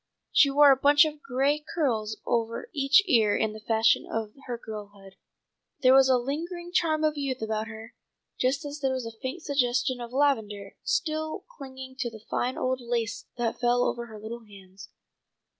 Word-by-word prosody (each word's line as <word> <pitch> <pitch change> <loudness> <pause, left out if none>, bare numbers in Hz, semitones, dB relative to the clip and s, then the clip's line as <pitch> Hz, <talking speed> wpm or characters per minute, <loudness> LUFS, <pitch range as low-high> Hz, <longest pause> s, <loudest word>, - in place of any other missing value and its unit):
She 280 - +5
wore 285 +1 +7
a - - +6
bunch 290 +2 +6
of 305 -1 -5
gray 275 +3 +1 0.2
curls 220 -9 0
over 230 - -2
each 280 +4 +4
ear 225 - +3
in 220 -1 0
the 215 - -9
fashion 220 +1 +2
of 220 -1 -3
her 240 -1 -3
girlhood. 205 -3 -10 0.7
There 255 0 +7
was 265 0 +6
a 255 - +5
lingering 340 +7 -4
charm 320 -3 +1
of 305 -1 +1
youth 265 -2 -2
about 220 0 -2
her, 225 +1 -10 0.5
just 265 +3 0
as 290 +1 -6
there 270 -2 0
was 255 -2 -3
a 230 - -5
faint 280 +6 -5
suggestion 250 -2 0
of 235 0 -7
lavender 220 -8 0
still 315 -1 -2
clinging 260 -2 -10
to 245 -3 -1
the 220 -1 -13
fine 250 +1 -1
old 255 0 -1
lace 235 -2 -3
that 235 -2 -2
fell 245 0 +2
over 235 -1 -2
her 220 -2 -10
little 230 +2 -7
hands. 195 -2 -14
250 Hz, 180 wpm, -27 LUFS, 225-285 Hz, 0.7 s, wore